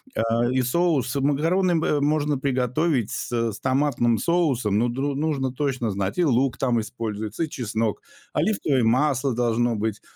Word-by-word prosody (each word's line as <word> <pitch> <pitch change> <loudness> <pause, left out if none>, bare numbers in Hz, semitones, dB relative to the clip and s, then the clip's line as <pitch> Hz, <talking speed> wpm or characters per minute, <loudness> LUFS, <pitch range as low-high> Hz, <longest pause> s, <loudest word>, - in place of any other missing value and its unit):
А, 115 +1 +1
и 130 0 +2
соус 140 -1 +1
макароны, 160 +7 +1
м, 160 - +1
э, 145 - +1
можно 150 -1 +1
приготовить 130 0 0
с - - -4
с 115 -2 -2
томатным 130 -3 +1
соусом, 130 - +1
но 120 - +2
дру 135 +3 -2
нужно 140 -3 -1
точно 130 -4 -1
знать: 95 0 -3
и 180 - +3
лук 130 -2 +1
там 125 -3 +1
используется, 110 - -4
и 160 - -3
чеснок, 110 -4 -2 0.3
оливковое 150 - +1
масло 130 +2 +2
должно 120 0 +1
быть. 110 0 -3
130 Hz, 160 wpm, -24 LUFS, 115-150 Hz, 0.3 s, и